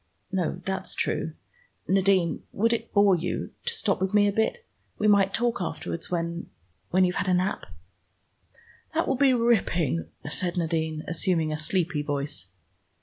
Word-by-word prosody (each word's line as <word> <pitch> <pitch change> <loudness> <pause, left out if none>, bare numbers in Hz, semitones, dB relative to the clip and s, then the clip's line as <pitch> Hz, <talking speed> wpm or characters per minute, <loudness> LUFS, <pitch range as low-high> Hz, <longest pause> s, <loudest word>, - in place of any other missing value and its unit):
"No, 180 -2 -1
that's 190 0 -1
true. - - -1 0.5
Nadine, 190 -3 +2
would 230 +3 +2
it 235 - -3
bore 200 -2 +5
you 175 +1 -3
to 475 - 0
stop 200 - 0
with 190 +2 0
me 205 0 +5
a - - +2
bit? 220 - 0 0.3
We 215 - +1
might 200 -2 +5
talk 235 0 0
afterwards, 170 -1 -4
when 170 -1 -3 0.4
when 185 +1 +4
you've 180 0 -1
had - - -1
a 180 - +4
nap." 185 +2 -1 1.3
"That 330 - +1
will - - +2
be 265 +1 +4
ripping," 180 - +1 0.2
said 175 +4 -1
Nadine, 160 -2 -1
assuming 165 -2 +1
a - - -2
sleepy 165 -1 0
voice. 145 -5 -3
185 Hz, 155 wpm, -26 LUFS, 165-205 Hz, 1.3 s, bore